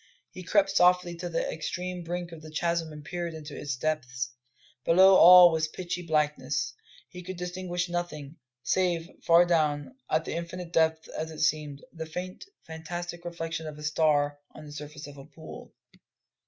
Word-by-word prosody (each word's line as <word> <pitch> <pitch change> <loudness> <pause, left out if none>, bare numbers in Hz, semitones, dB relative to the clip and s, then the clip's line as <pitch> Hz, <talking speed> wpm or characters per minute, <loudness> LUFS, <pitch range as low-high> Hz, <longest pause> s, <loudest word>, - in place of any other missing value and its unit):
He 185 - -9
crept 195 +2 +2
softly 180 -2 +4
to 175 +1 -5
the 165 - -1
extreme 180 +2 -4
brink 175 +1 -4
of 165 -2 -10
the 155 - -10
chasm 165 +1 -1
and 150 -1 -10
peered 175 -2 -4
into 150 -2 -8
its 140 -3 -4
depths. 130 -3 -2 0.5
Below 190 +3 +6
all 180 -1 +9
was 160 -1 0
pitchy 180 +2 -5
blackness; 150 -5 -1 0.3
he 180 +7 -10
could 185 +1 -7
distinguish 180 0 -3
nothing, 175 -4 -5 0.3
save, 175 -3 +1
far 170 +1 +6
down, 155 - 0 0.2
at 155 +1 0
an - - -3
infinite 170 +1 -6
depth 160 -1 +2
as 160 +1 -5
it 155 -1 -7
seemed, 150 -2 0
the 160 -1 -6
faint, 180 +3 -6 0.2
fantastic 175 +1 -6
reflection 165 -2 -5
of 150 -1 -8
a 150 - -10
star 150 -1 +1 0.2
on 155 - -10
the 150 - -10
surface 150 0 -8
of 145 - -10
the 135 - -11
pool. 160 +1 -12
165 Hz, 170 wpm, -28 LUFS, 150-175 Hz, 0.5 s, all